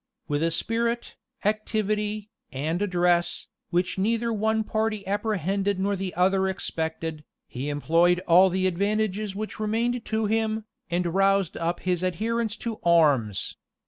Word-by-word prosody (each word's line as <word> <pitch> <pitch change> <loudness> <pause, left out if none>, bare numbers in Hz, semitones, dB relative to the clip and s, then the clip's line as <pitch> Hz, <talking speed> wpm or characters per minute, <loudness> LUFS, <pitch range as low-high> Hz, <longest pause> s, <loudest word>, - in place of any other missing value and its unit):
With 145 0 0
a 165 - +2
spirit, 230 +7 -1 0.3
activity, 215 0 -1 0.2
and 155 +7 -2
address, 175 -3 +1 0.2
which 180 +1 0
neither 230 +3 +1
the - - 0
one 220 +1 +1
party 215 -1 -1
apprehended 200 -1 0
nor 200 +1 +1
the 190 -1 -3
other 190 +2 +3
expected, 160 -4 -3 0.2
he 130 +4 -5
employed 165 +4 +3
all 185 +1 +6
the 185 +1 0
advantages 200 +2 0
which 215 +1 -5
remained 230 +3 0
to 220 0 0
him, 220 0 0 0.2
and 175 +1 0
roused 195 -1 +2
up 170 +1 -2
his 180 -1 0
adherents 220 +4 -1
to 225 -2 -3
arms. 145 - +3
195 Hz, 140 wpm, -26 LUFS, 175-215 Hz, 0.3 s, all